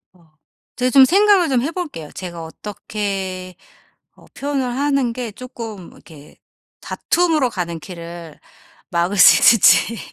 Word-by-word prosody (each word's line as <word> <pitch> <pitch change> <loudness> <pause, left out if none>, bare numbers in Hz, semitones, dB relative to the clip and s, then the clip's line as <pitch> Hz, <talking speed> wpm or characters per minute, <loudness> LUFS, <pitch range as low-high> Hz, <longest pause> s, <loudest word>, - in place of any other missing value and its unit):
어 160 -3 -27 0.4
제가 255 0 0
좀 270 -2 +7
생각을 390 0 +3
좀 250 -3 +1
해 300 +5 -2
볼게요. 300 - -6
제가 175 -3 -8
어떻게 190 0 -6 0.6
어 - - -21
표현을 280 -1 -2
하는 275 -3 0
게 240 -2 -5
쪼끔 225 -5 -9
이렇게 150 -3 -17 0.4
다툼으로 320 -7 0
가는 170 -5 -4
길을 170 -2 -10 0.5
막을 175 +4 -1
수 - - +7
있을지. 230 0 +5
210 Hz, 255 characters per minute, -19 LUFS, 175-270 Hz, 0.6 s, 좀